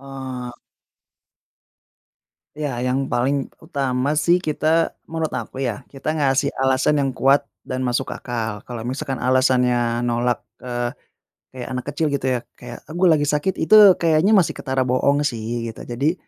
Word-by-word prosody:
eh 130 Hz, -2 st, -7 dB, 2.1 s
Ya, 145 Hz, -5 st, -3 dB
yang 135 Hz, +2 st, -1 dB
paling 135 Hz, +3 st, 0 dB
utama 140 Hz, -3 st, -1 dB
sih 170 Hz, +4 st, +3 dB
kita 160 Hz, 0 st, +1 dB, 0.2 s
menurut 160 Hz, -1 st, -2 dB
aku, 125 Hz, +1 st, -5 dB
ya, 120 Hz, -6 st, -2 dB
kita 140 Hz, +3 st, -3 dB
ngasih 140 Hz, -2 st, +1 dB
alasan 130 Hz, +3 st, +2 dB
yang 135 Hz, -, 0 dB
kuat, 135 Hz, +2 st, +3 dB, 0.2 s
dan 130 Hz, 0 st, -3 dB
masuk 125 Hz, -1 st, -1 dB
akal. 115 Hz, -4 st, -4 dB
Kalo 120 Hz, -2 st, -7 dB
misalkan 135 Hz, +1 st, -3 dB
alasannya 125 Hz, -2 st, +2 dB
nolak, 120 Hz, +1 st, 0 dB, 0.2 s
eee, 120 Hz, 0 st, -3 dB, 0.6 s
kayak 125 Hz, -2 st, -8 dB
anak 125 Hz, -1 st, -4 dB
kecil 145 Hz, +3 st, -1 dB
gitu, 140 Hz, -, -2 dB
ya, -, -, -4 dB
kayak, 120 Hz, -1 st, -10 dB
"Eh, 155 Hz, -, -10 dB
gua 180 Hz, +2 st, +3 dB
lagi 145 Hz, -, 0 dB
sakit." 150 Hz, +6 st, 0 dB
Itu 205 Hz, +1 st, +7 dB
kayaknya 165 Hz, +3 st, +3 dB
masih 185 Hz, -6 st, +3 dB
ketara 130 Hz, -1 st, -1 dB
bohong 140 Hz, +3 st, +2 dB
sih, 115 Hz, -3 st, -3 dB
gitu. -, -, -12 dB
Jadi, 140 Hz, +7 st, +1 dB
135 Hz, 150 wpm, -21 LUFS, 125-150 Hz, 2.1 s, Itu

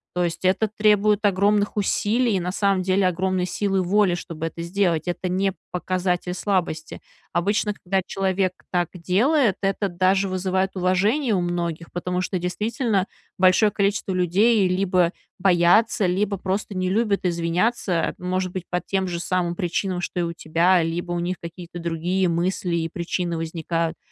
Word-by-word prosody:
То 180 Hz, -, +1 dB
есть, 170 Hz, +1 st, -3 dB
это 190 Hz, +4 st, +3 dB
требует 210 Hz, 0 st, +2 dB
огромных 205 Hz, +1 st, +2 dB
усилий, 215 Hz, +3 st, +1 dB
и -, -, +1 dB
на 180 Hz, +1 st, -2 dB
самом 195 Hz, -1 st, +1 dB
деле, 190 Hz, +1 st, +2 dB
огромной 185 Hz, 0 st, 0 dB
силы 195 Hz, 0 st, 0 dB
воли, 190 Hz, +1 st, +2 dB
чтобы 165 Hz, -2 st, -5 dB
это 165 Hz, +1 st, -5 dB
сделать. 170 Hz, -1 st, 0 dB
Это 175 Hz, +1 st, -2 dB
не 190 Hz, +2 st, 0 dB, 0.2 s
показатель 180 Hz, 0 st, -1 dB
слабости. 180 Hz, -5 st, -2 dB, 0.3 s
Обычно, 205 Hz, +4 st, +1 dB
когда 190 Hz, -1 st, -1 dB
человек 190 Hz, -1 st, 0 dB, 0.2 s
так 175 Hz, -2 st, 0 dB
делает, 205 Hz, -, +2 dB
это 195 Hz, +1 st, 0 dB
даже 190 Hz, +2 st, +2 dB
вызывает 185 Hz, +1 st, -1 dB
уважение 200 Hz, +8 st, +1 dB
у 185 Hz, -, +1 dB
многих, 170 Hz, -1 st, -3 dB
потому 180 Hz, +1 st, -2 dB
что, 185 Hz, +1 st, -2 dB
действительно, 205 Hz, +3 st, -1 dB, 0.3 s
большое 185 Hz, +3 st, +5 dB
количество 200 Hz, -1 st, 0 dB
людей 190 Hz, +4 st, +3 dB
либо 185 Hz, -1 st, +2 dB, 0.3 s
боятся, 190 Hz, +5 st, +4 dB
либо 195 Hz, +3 st, 0 dB
просто 195 Hz, +2 st, -3 dB
не 185 Hz, 0 st, -1 dB
любят 205 Hz, -2 st, +1 dB
извиняться, 175 Hz, +2 st, 0 dB
может 185 Hz, 0 st, -2 dB
быть, 180 Hz, -1 st, -5 dB
по 180 Hz, -, 0 dB
тем 190 Hz, -1 st, -1 dB
же 175 Hz, -1 st, -3 dB
самым 175 Hz, -1 st, -1 dB
причинам, 180 Hz, +1 st, -1 dB
что 180 Hz, -, -3 dB
и -, -, +1 dB
у 170 Hz, 0 st, -3 dB
тебя, 170 Hz, +2 st, +2 dB
либо 170 Hz, +2 st, -3 dB
у 175 Hz, -, -1 dB
них 175 Hz, +1 st, -2 dB
какие-то 175 Hz, +1 st, -8 dB
другие 170 Hz, +3 st, 0 dB
мысли 175 Hz, +1 st, -1 dB
и 165 Hz, -1 st, 0 dB
причины 170 Hz, +1 st, -2 dB
возникают. 165 Hz, 0 st, -2 dB
185 Hz, 160 wpm, -23 LUFS, 175-195 Hz, 0.3 s, большое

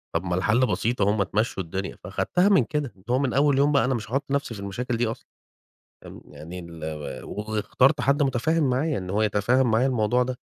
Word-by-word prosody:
طَب 85 Hz, -, 0 dB
ما 90 Hz, -1 st, -1 dB
الحَل 110 Hz, +7 st, +2 dB
بسيط 120 Hz, -1 st, -1 dB
أهو 100 Hz, +1 st, +4 dB
ما 100 Hz, -, +3 dB
تمشّوا 100 Hz, 0 st, -1 dB
الدنيا. 95 Hz, +3 st, -5 dB
فاخدتها 180 Hz, +3 st, +1 dB
من 190 Hz, -10 st, +5 dB
كده، 145 Hz, +3 st, -2 dB
اللي 95 Hz, -, -24 dB
هو 125 Hz, +2 st, +2 dB
من 135 Hz, -3 st, 0 dB
أول 140 Hz, 0 st, +3 dB
يوم 145 Hz, +1 st, +3 dB
بقى 140 Hz, -, +3 dB
أنا 130 Hz, -, +1 dB
مش 110 Hz, -3 st, -4 dB
هاحُط 135 Hz, +2 st, 0 dB
نَفسي 140 Hz, -4 st, -1 dB
في 100 Hz, -, -8 dB
المشاكل 115 Hz, +5 st, -3 dB
دي 120 Hz, -1 st, +1 dB
أصلًا. 115 Hz, -, -6 dB, 0.8 s
آمم -, -, -11 dB
يعني 85 Hz, +4 st, -9 dB
ال 85 Hz, -2 st, -9 dB, 0.4 s
واخترت 110 Hz, +7 st, 0 dB
حد 140 Hz, +2 st, +2 dB
متفاهِم 140 Hz, +3 st, +1 dB
معايا 140 Hz, +2 st, 0 dB
إن 90 Hz, -1 st, -6 dB
هو 105 Hz, +2 st, +1 dB
يتفهّم 115 Hz, +4 st, +2 dB
معايا 115 Hz, +4 st, +3 dB
الموضوع 125 Hz, -1 st, +2 dB
ده. 125 Hz, 0 st, -4 dB
120 Hz, 215 wpm, -25 LUFS, 100-135 Hz, 0.8 s, من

